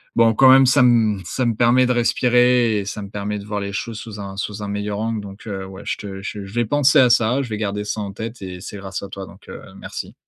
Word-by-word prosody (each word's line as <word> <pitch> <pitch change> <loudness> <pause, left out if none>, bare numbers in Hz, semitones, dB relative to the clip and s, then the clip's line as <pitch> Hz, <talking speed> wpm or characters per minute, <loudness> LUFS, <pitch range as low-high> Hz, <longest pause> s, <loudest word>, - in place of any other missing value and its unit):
bon, 115 -1 +4
quand 130 +2 +6
même, 135 0 +7
ça 130 +1 +5
me 115 -4 +3
ça 125 +8 -2
me 115 - 0
permet 125 +2 +4
de 125 - +2
respirer 120 -1 +3
et 100 - -5
ça 105 - -5
me 100 - -8
permet 105 +1 -4
de 100 - -10
voir 105 -1 -3
les 100 0 -5
choses 110 +2 -4
sous 105 -3 -9
un 100 0 -8
sous 105 +1 -4
un - - -4
meilleur 105 0 -3
angle. 110 -1 -2
Donc, 100 +2 -11
heu, 95 -2 -5
ouais, 95 +1 -10
je - - -2
te 95 -1 -8
je 100 0 -6
je 95 - -12
vais 120 0 +1
penser 145 +4 +4
à 125 -2 +6
ça, 120 +3 +3
je 130 - -6
vais 105 - -3
garder 105 -1 -2
ça 105 - -3
en 100 -1 -5
tête 115 +3 -7
et 90 -1 -7
c'est 105 - -8
grâce 95 -1 -6
à 100 - -7
toi, 95 0 -7
donc - - -16
heu, - - -8 0.2
merci. - - -7
105 Hz, 285 wpm, -21 LUFS, 100-120 Hz, 0.2 s, même